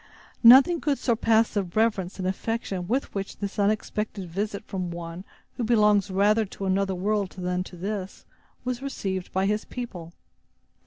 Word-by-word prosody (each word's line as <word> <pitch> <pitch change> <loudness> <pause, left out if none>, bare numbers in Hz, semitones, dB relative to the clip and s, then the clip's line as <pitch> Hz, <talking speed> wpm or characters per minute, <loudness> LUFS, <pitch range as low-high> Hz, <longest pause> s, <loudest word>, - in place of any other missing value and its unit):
Nothing 270 +8 +8
could 285 -3 +1
surpass 225 -2 +2
the 205 - +1
reverence 195 0 0
and 185 -1 -2
affection 190 -2 -3
with 255 +6 -1
which 195 -1 -4
this 200 0 -5
unexpected 210 -1 -1
visit 200 +4 -3
from 185 -3 -4
one 170 +1 -7 0.3
who 245 - -1
belongs 210 -3 +3
rather 205 +3 +3
to 195 -1 -7
another 190 0 +1
world 200 +1 -1
than 180 0 -1
to 180 - -11
this, 195 +1 -5 0.4
was 250 0 -2
received 190 -9 -4
by 190 +1 +1
his 210 +1 0
people. 180 -10 -7
200 Hz, 155 wpm, -26 LUFS, 185-220 Hz, 0.4 s, Nothing